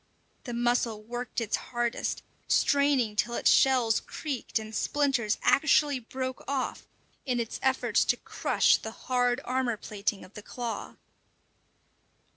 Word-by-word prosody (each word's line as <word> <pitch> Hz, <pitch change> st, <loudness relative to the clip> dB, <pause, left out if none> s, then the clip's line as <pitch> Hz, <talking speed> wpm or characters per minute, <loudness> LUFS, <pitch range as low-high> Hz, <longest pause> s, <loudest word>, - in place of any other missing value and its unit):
The 240 Hz, -, -5 dB
mussel 240 Hz, -2 st, 0 dB
worked 240 Hz, +3 st, -4 dB
its 225 Hz, -2 st, -1 dB
hardest, 240 Hz, -1 st, -2 dB, 0.2 s
straining 280 Hz, -6 st, +2 dB
till 235 Hz, +3 st, 0 dB
its -, -, +3 dB
shells 250 Hz, -5 st, +4 dB
creaked 280 Hz, -7 st, -4 dB
and 220 Hz, 0 st, -6 dB
splinters 265 Hz, -5 st, +1 dB
actually 290 Hz, -1 st, +4 dB
broke 260 Hz, +2 st, -5 dB
off 270 Hz, -2 st, -3 dB, 0.4 s
in 250 Hz, -3 st, -1 dB
its 230 Hz, -1 st, -4 dB
efforts 255 Hz, -4 st, +2 dB
to 245 Hz, -, +2 dB
crush -, -, +2 dB
the -, -, -7 dB
hard 245 Hz, 0 st, 0 dB
armour 250 Hz, -3 st, 0 dB
plating 205 Hz, -1 st, -3 dB
of 185 Hz, -, -19 dB
the 210 Hz, -, -9 dB
claw. 235 Hz, +2 st, -5 dB
245 Hz, 130 wpm, -28 LUFS, 225-260 Hz, 0.4 s, shells